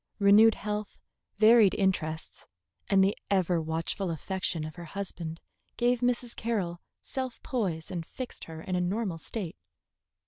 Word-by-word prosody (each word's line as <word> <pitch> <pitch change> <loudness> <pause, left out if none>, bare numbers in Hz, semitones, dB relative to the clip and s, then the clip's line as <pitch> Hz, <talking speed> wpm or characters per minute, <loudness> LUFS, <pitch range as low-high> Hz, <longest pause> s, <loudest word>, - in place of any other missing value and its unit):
Renewed 210 +2 +7
health, 210 0 -4 0.4
varied 215 -1 +7
interests, 160 -5 -1 0.4
and 195 -1 +5
the 195 +2 +2
ever 180 -3 +2
watchful 165 +4 -2
affection 170 0 -2
of 155 - -6
her 175 -1 -8
husband 170 -2 -5 0.4
gave 245 0 +3
Mrs. 245 -1 0
Carroll 195 -7 -2 0.2
self 260 -2 -4
poise 185 -11 -2
and 175 -3 -3
fixed 255 +9 -7
her 160 -1 -8
in 185 - -2
a 180 - +1
normal 185 -1 -1
state. 190 -1 -5
190 Hz, 140 wpm, -29 LUFS, 170-220 Hz, 0.4 s, Renewed